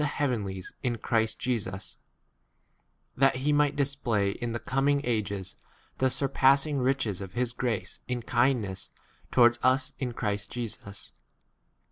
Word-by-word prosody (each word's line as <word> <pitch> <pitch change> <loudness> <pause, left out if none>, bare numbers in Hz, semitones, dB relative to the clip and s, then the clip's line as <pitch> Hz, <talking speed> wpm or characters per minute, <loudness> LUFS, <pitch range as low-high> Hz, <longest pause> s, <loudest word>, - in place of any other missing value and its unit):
heavenlies 110 -11 -2
in 120 -2 -1
Christ 110 0 0
Jesus, 105 -6 -3 1.2
that 135 +1 +4
he 140 +3 +1
might 145 0 +3
display 130 -8 +1
in 120 +3 -4
the 115 - -1
coming 140 +2 +1
ages 100 -6 -2 0.4
the 130 - +3
surpassing 140 +2 +3
riches 125 -7 0
of 95 -1 -7
his 120 -1 0
grace 120 -4 -2
in 125 -1 -2
kindness 120 -6 0
k - - -32 0.3
towards 120 -1 +5
us 130 +1 +2
in 130 - -1
8 120 - -9
Christ 105 -2 -2
Jesus. 110 -4 -6
120 Hz, 135 wpm, -28 LUFS, 105-135 Hz, 1.2 s, towards